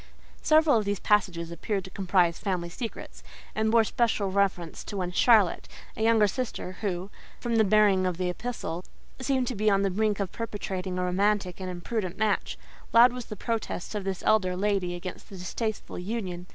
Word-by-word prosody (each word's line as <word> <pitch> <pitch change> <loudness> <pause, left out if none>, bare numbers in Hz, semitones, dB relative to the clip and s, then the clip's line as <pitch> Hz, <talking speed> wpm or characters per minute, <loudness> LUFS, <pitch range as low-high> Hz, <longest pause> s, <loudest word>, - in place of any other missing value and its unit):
Several 310 -4 +5
of 210 - -3
these 200 -1 -1
passages 180 -5 +1
appeared 195 +4 -2
to 190 - -11
comprise 180 -3 +2
family 180 -4 -2
secrets, 225 +6 -7 0.3
and 220 0 +1
bore 230 0 +5
special 220 -3 0
reference 185 -4 0
to 205 - -5
one 180 -2 -2
"Charlotte," 210 -1 +4 0.3
a - - -6
younger 225 -1 +5
sister 205 -4 -4
who, 190 -1 -3 0.3
from 235 -2 0
the 220 - +6
bearing 200 -2 +4
of 180 -2 -2
the 180 0 -1
epistle, 180 -3 -4 0.4
seemed 260 -1 +1
to 245 - -3
be 215 +1 +2
on 195 -1 +3
the 195 - +1
brink 210 +1 0
of 195 -3 -2
perpetrating 195 -4 -4
a 180 - 0
romantic 195 0 +1
and 185 - -4
imprudent 185 +1 -3
match; 215 -1 0 0.4
loud 240 +1 +7
was 250 -2 -6
the 210 - -6
protest 225 -4 -3
of 210 -2 -3
this 190 -1 -3
elder 185 -4 +3
lady 195 -3 0
against 180 +1 -8
the 195 - -9
distasteful 215 +4 -4
union. 180 -3 -4
200 Hz, 185 wpm, -27 LUFS, 180-220 Hz, 0.4 s, loud